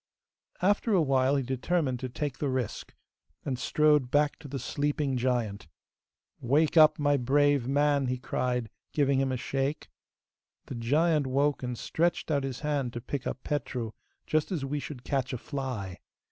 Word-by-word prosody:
After 205 +3 +2
a 185 - +5
while, 135 -1 +2
he 135 - +1
determined 130 +1 -1
to 130 - -4
take 140 +1 -4
the 145 - 0
risk, 130 -5 -3 0.5
and 130 -3 -2
strode 150 -1 +3
back 145 +2 +2
to 155 - -10
the 140 0 -4
sleeping 145 +1 -1
giant. 120 -6 -1 0.7
'Wake 145 +7 +2
up, 155 -2 +7
my 145 -1 +2
brave 140 0 +2
man!' 145 0 +2
he 125 0 -1
cried, 125 -2 -2 0.2
giving 140 -2 +2
him 135 -1 +1
a 130 - -1
shake. 135 +3 -2 0.8
The - - -7
giant 145 +5 +2
woke 140 +2 +1
and 125 -2 -4
stretched 170 +4 0
out 140 -2 +1
his 135 -2 -4
hand 145 -5 -1
to 120 - -4
pick 130 +1 -4
up 130 - -5
Petru, 125 -6 -3 0.3
just 155 +4 0
as 155 -7 -2
we 145 +2 -2
should 135 -3 -8
catch 135 -1 -1
a - - -1
fly. 125 - -5
135 Hz, 170 wpm, -29 LUFS, 125-150 Hz, 0.8 s, up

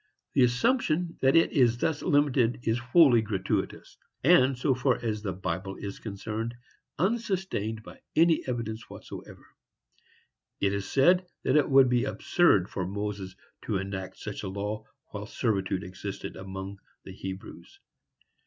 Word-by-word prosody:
The 135 - +3
assumption 165 - +1
that 135 +2 +4
it 165 - +5
is 120 -4 +3
thus 155 +4 -1
limited 135 -5 +2
is 115 +2 +1
wholly 120 -1 +5
gratuitous, 105 -4 -3 0.3
and, 135 -4 +5
so 135 +2 +2
far 130 0 +2
as 110 -2 -2
the 100 -3 -2
Bible 95 +1 -4
is 100 -1 -7
concerned, 110 +2 -4 0.4
unsustained 190 - -1
by - - -12 0.2
any 165 0 +4
evidence 115 -3 -4
whatever. - - -10 1.1
It 100 0 +1
is 100 -1 -3
said 180 +6 +4 0.2
that 130 - +2
it 150 - +4
would 135 -1 +7
be 125 -1 +2
absurd 105 - +3
for 90 -2 -3
Moses 100 -1 -4 0.3
to 105 - 0
enact 95 -1 -5
such 105 -2 -6
a 100 - -5
law 105 +3 -4 0.3
while 105 0 -6
servitude 95 -5 -1
existed 95 +1 -7
among 95 +1 -7 0.2
the - - -9
Hebrews. 95 0 -9
115 Hz, 145 wpm, -28 LUFS, 100-135 Hz, 1.1 s, would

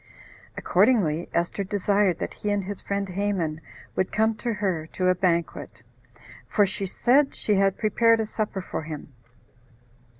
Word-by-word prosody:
Accordingly, 175 -10 +2
Esther 175 +4 -1
desired 200 -2 +1
that - - -4
he 210 - -4
and 205 -1 0
his 195 +1 -6
friend 200 0 -2
Haman 180 -5 -2 0.3
would 185 - 0
come 220 +1 +2
to 235 - -2
her 185 -7 -2
to 185 -1 +1
a - - +5
banquet, 170 -9 -1 0.6
for 205 - +3
she 195 0 -3
said 270 +8 +2
she 210 - 0
had 195 -1 +2
prepared 230 +1 +3
a 220 - 0
supper 210 -2 -3
for - - -4
him. 150 -2 -8
195 Hz, 155 wpm, -25 LUFS, 175-210 Hz, 0.6 s, a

